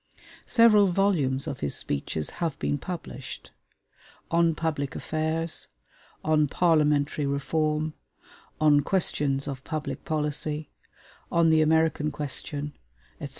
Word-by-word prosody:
Several 220 -4 +6
volumes 170 -8 +1
of 145 -4 -5
his 70 - -2
speeches 75 +2 -2
have 165 -4 -1
been 145 - -1
published: 135 -7 -7 0.8
'On 165 -1 +3
Public 150 -4 -2
Affairs'; 160 +1 -2 0.6
'On 155 -1 +3
Parliamentary 150 -3 +2
Reform'; 155 +2 0 0.7
'On 150 -2 +5
Questions 145 -5 +1
of 135 -1 -5
Public 155 -1 -4
Policy'; 150 -1 -2 0.6
'On 170 -1 +4
the 160 0 +5
American 160 -1 +2
Question,' 145 0 -4 0.5
etc. - - -6
155 Hz, 110 wpm, -27 LUFS, 145-160 Hz, 0.8 s, Several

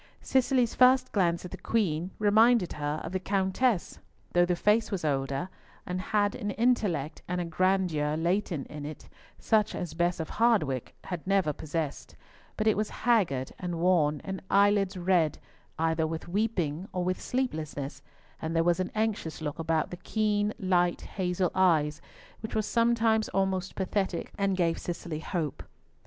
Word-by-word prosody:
Cicely's 255 -2 +2
first 255 +1 +5
glance 175 -4 +1
at 180 - -8
the - - -6
Queen 180 -6 0
reminded 215 -1 +4
her 150 +1 -2
of 165 - -5
the 185 - -1
Countess, 195 +3 0 0.3
though 175 0 +4
the 180 - +1
face 210 +5 +2
was 190 -6 -3
older, 135 +2 -1 0.4
and 180 +1 -3
had 205 +1 +1
an 205 - -4
intellect 200 - 0
and 180 0 -2
a 175 - -1
grandeur 170 -4 +1
latent 175 -2 0
in 150 -1 -8
it, 150 +1 -8 0.3
such 215 -1 +1
as 175 -3 -4
Bess 175 +1 0
of 160 - -3
Hardwicke 190 - +1
had 180 -2 -6
never 195 -6 +2
possessed; 155 -1 -4 0.4
but 215 - -1
it 220 - +4
was 210 0 -1
haggard 185 - +1
and 180 -2 -3
worn, 165 -4 +2
the 190 -1 -4
eyelids 200 -1 +3
red, 175 -3 +2 0.4
either 160 0 +1
with 160 +1 -5
weeping, 185 -4 -1
or 180 - -2
with 185 +1 -1
sleeplessness, 155 - -3 0.4
and 160 +1 -3
there 165 - +3
was 175 +1 +2
an 185 - -1
anxious 215 -7 -1
look 150 0 -4
about 160 -1 0
the 180 - -6
keen 210 +2 0
light 180 -2 +1
hazel 180 -1 -1
eyes 160 -5 +2 0.4
which 220 +1 -6
was 215 -1 +1
sometimes 230 -1 +2
almost 190 -1 -1
pathetic, 190 -2 -2
and 195 -2 0
gave 165 -2 +1
Cicely 170 -2 -5
hope. 160 -3 -3
180 Hz, 160 wpm, -29 LUFS, 160-205 Hz, 0.4 s, first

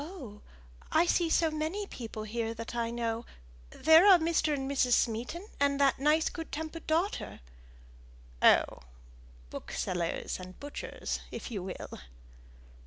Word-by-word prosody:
"Oh! 275 - -9 0.5
I 325 +2 +4
see 345 -1 +2
so 320 0 +3
many 315 +7 -2
people 225 - -7
here 225 +1 -3
that 230 +1 -7
I 235 -1 -1
know. 230 -1 -2 0.5
There 320 - +6
are 385 -3 +9
Mr. 325 -2 +1
and 270 -2 -1
Mrs. 265 -3 +2
Smeaton, 245 - 0
and 280 0 +2
that 275 -2 +3
nice 300 +3 +3
good 325 -2 -6
tempered 320 +1 -6
daughter." 335 +6 -1 1.0
"Oh! - - +5 0.7
booksellers 175 0 -3
and 185 0 -10
butchers 290 0 -5
if - - -7
you 205 -5 -3
will." 185 0 -7
280 Hz, 135 wpm, -30 LUFS, 230-320 Hz, 1.0 s, are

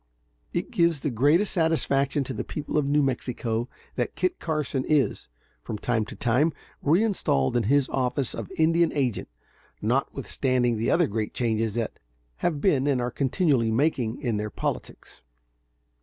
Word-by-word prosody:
It - - -3
gives 170 -4 +2
the 150 - -1
greatest 145 - +3
satisfaction 145 -4 +1
to 130 - -5
the - - -3
people 150 - -5
of 150 -2 +2
New 145 +1 +3
Mexico 120 -2 -2 0.3
that - - -1
Kit 365 -1 -1
Carson 150 -4 -1
is, 140 - +1 0.3
from 105 - -5
time 110 0 0
to - - -9
time, 135 +7 +2 0.3
reinstalled 165 - +2
in 120 -3 +2
his 140 -1 +4
office 130 0 -1
of 115 -4 -6
Indian 165 +1 +3
agent, 130 -7 -1 0.5
notwithstanding 125 - 0
the 115 - 0
other - - +4
great 105 +1 -3
changes 115 -2 0
that 115 -2 -3 0.4
have 160 -4 -1
been 145 -6 +2
and 135 -3 +2
are 120 0 -1
continually 135 -3 +1
making 120 -1 0
in 120 -6 -1
their 105 +1 -2
politics. - - -5
135 Hz, 155 wpm, -26 LUFS, 115-150 Hz, 0.5 s, his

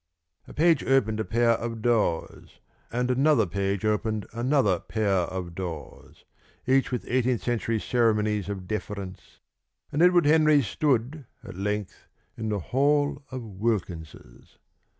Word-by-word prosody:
A - - -11
page 165 -1 +3
opened 110 -5 +2
a - - +1
pair 115 +1 +2
of 115 -1 -3
doors, 110 -9 -1 0.3
and 125 +1 0
another 135 -2 +3
page 100 +2 -2
opened 110 0 0
another 120 - +2
pair 110 -2 -1 0.2
of 90 -2 -5
doors, 85 -3 -8 0.4
each 135 +1 +2
with 125 - -3
eighteen 125 0 +1
century 115 -1 -1
ceremonies 105 -4 +1
of 95 -3 -5
deference, 100 -3 -6 0.5
and 145 - 0
Edward 175 -2 +5
Henry 155 -1 +5
stood 130 +4 -1 0.2
at - - -9
length 105 +1 -4 0.3
in 110 -1 -4
the 105 - 0
hall 145 - +1
of 130 -1 -6
Wilkins's. 95 -6 -5
115 Hz, 130 wpm, -26 LUFS, 100-130 Hz, 0.5 s, Edward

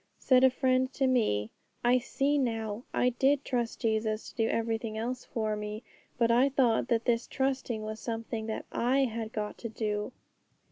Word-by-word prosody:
Said 255 -1 +4
a 260 - +8
friend 260 0 +1
to 270 - +1
me, 215 - +1 0.3
'I 245 +1 +4
see 280 +4 0
now! 225 -3 -2
I 250 - +2
did 270 +3 +2
trust 240 -3 -2
Jesus 220 -2 0
to - - -17
do 225 -2 +1
everything 225 -1 -1
else 245 +3 -3
for 215 -2 -2
me, 210 +2 -5 0.3
but 230 -1 +3
I 250 +4 +5
thought 250 -4 +2
that 235 -2 +1
this 235 -1 +1
trusting 265 -4 -1
was 215 0 -5
something 225 -1 -4
that 220 - -4
I 255 +3 +2
had 230 -3 -2
got 210 -1 -4
to 230 - -5
do.' 210 0 -2
230 Hz, 180 wpm, -30 LUFS, 220-255 Hz, 0.3 s, a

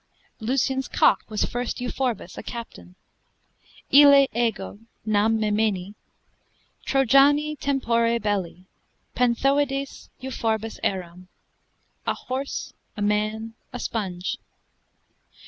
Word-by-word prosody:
Lucian's 265 +2 0
cock - - +3
was 215 -1 0
first 245 0 -3
Euphorbus, 245 -6 -3
a - - -6
captain: 90 - -9 1.0
Ille 280 0 +8
ego 225 -4 -2 0.3
(nam 215 +1 +2
memini) 210 -3 0 0.9
Trojani 280 +3 +4
tempore 235 -5 +1
belli, 190 -4 -2 0.5
Panthoides 275 +3 0
Euphorbus 225 -4 -2
eram, 180 -1 -3 0.8
a - - +1
horse, 265 +2 -5 0.2
a - - -4
man, 215 +2 -1 0.2
a 250 - -6
sponge. 190 -7 -3
230 Hz, 90 wpm, -24 LUFS, 210-265 Hz, 1.0 s, Ille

